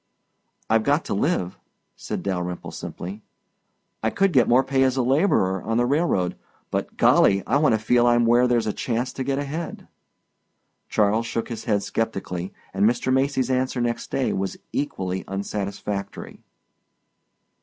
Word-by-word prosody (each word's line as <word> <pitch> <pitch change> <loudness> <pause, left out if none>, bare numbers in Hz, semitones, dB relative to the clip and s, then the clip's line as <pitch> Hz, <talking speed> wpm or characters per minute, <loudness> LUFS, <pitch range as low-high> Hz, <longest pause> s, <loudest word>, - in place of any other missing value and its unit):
"I've 115 0 +3
got 145 +6 +1
to - - -2
live," 100 - -1 0.4
said - - -5
Dalyrimple 90 -2 -3
simply. 95 +5 -7 0.8
"I 110 - +1
could 195 - +1
get - - +5
more 125 +2 +5
pay 135 -1 0
as 130 0 +2
a 130 - +2
laborer 120 - +2
on 115 0 -1
the 120 - +3
railroad 135 - +1 0.4
but, - - -3
Golly, 100 0 +4
I - - +2
want 150 -5 +3
to - - +1
feel 120 +2 +3
I'm 120 0 +4
where 120 +2 +4
there's 120 -2 +2
a 105 - -1
chance 120 +1 -2
to 135 - -3
get 135 +1 -1
ahead." 145 +4 -5 1.0
Charles 110 +2 +2
shook 115 - -3
his 115 - -6
head 105 -3 +1
sceptically 95 -4 -3 0.2
and 100 +3 +4
Mr. 125 +2 0
Macy's 130 -1 +1
answer 130 0 0
next 120 -1 -2
day 135 - 0
was 95 0 -3 0.2
equally 95 -10 -2
unsatisfactory. 100 0 -4
115 Hz, 155 wpm, -24 LUFS, 100-130 Hz, 1.0 s, get